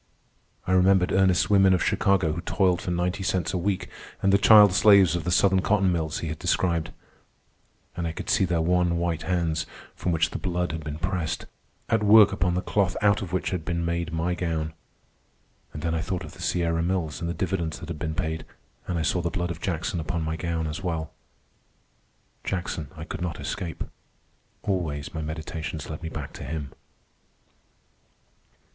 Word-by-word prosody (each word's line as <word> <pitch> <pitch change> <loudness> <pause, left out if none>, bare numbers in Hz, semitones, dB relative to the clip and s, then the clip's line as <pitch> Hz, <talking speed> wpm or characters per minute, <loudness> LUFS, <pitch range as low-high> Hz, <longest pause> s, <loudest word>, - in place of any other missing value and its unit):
I - - -1
remembered 95 0 +4
Ernest's 95 -2 +3
women 95 -2 +5
of 90 - 0
Chicago 95 -5 +2
who 85 - -4
toiled 90 -1 +1
for - - -4
ninety 90 +2 -1
cents 95 -1 -1
a - - +1
week, 95 +1 -1 0.4
and 100 0 +4
the 100 - +5
child 105 -1 +8
slaves 100 -5 +6
of 85 -1 -3
the 90 - 0
Southern 95 +1 +4
cotton 100 -2 +2
mills 80 -3 -2
he 80 - -3
had 75 0 -5
described. 85 -2 0 1.1
And 85 -1 -2
I - - -2
could - - -7
see - - +3
their 85 -2 +1
wan 90 0 +2
white 85 -2 -1
hands, 80 -2 -1 0.3
from 90 - -2
which 85 +1 +1
the - - -4
blood 90 -2 -1
had 80 0 -5
been 75 0 -5
pressed, 90 -2 -2 0.4
at 110 -2 +2
work 105 0 +7
upon 90 -1 0
the 90 - -1
cloth 95 -3 0
out 105 0 +4
of 95 -4 -6
which 95 - -1
had 90 -4 -2
been 85 0 -2
made 85 -1 -2
my 80 +2 -1
gown. 80 -3 -2 1.0
And 75 - -8
then 85 -1 0
I 80 - 0
thought 90 0 -3
of - - -9
the - - -12
Sierra 85 -2 0
Mills 85 -3 -1
and 85 - -2
the 85 - -3
dividends 85 -4 -2
that 85 -2 -9
had 80 -3 -5
been 80 -1 -3
paid, 80 -3 -2 0.4
and 90 - -1
I 80 - 0
saw 90 - +1
the 85 - -1
blood 90 -1 -2
of 85 0 -7
Jackson 90 -1 -2
upon 80 +1 -2
my 80 +1 -2
gown 80 0 -2
as 75 +4 -4
well. 80 -4 -3 1.3
Jackson 85 -4 -3
I 80 - -6
could 80 - -6
not 90 -2 -3
escape. 85 -2 -4 0.8
Always 80 -8 -2
my 80 - -3
meditations 80 0 -5
led 75 - -6
me 80 - -4
back 75 -4 -6
to - - -8
him. 75 0 -5
85 Hz, 195 wpm, -26 LUFS, 80-95 Hz, 1.3 s, child